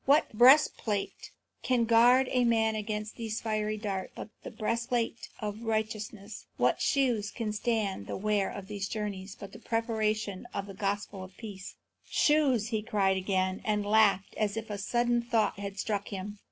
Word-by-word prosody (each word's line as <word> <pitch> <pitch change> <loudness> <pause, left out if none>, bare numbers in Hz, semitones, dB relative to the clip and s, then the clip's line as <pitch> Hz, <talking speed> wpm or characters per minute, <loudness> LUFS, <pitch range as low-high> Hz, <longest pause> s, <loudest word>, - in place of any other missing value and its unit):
What 285 -1 +4
breastplate 240 -4 +4 0.3
can 250 -2 +2
guard 240 +3 +5
a 250 -1 +3
man 225 -2 +3
against 215 0 -4
these 225 -2 -3
fiery 215 -1 -1
darts 200 -3 -4
but - - -7
the - - -7
breastplate 230 +1 -2
of 210 0 -4
righteousness? 215 -2 -3
What - - +2
shoes 245 -7 +1
can 215 -3 -3
stand 210 - -1
the - - -4
wear 205 -1 +1
of 200 - -7
these 200 -1 -4
journeys 200 -2 -4
but 200 -2 -8
the 225 - -10
preparation 215 -4 -1
of 200 - -2
the 200 - -9
gospel 200 0 -3
of 185 0 -13
peace?" 200 -5 -8 0.3
"Shoes?" 270 -8 +3
he 220 -3 -1
cried 205 -4 +1
again, 185 0 0
and 210 -1 0
laughed 205 -2 +3
as 210 0 0
if 220 -1 -5
a 205 - -4
sudden 240 +3 +1
thought 225 -4 0
had 200 -1 -5
struck 200 -1 -2
him. 200 +1 -6
215 Hz, 165 wpm, -30 LUFS, 200-230 Hz, 0.3 s, guard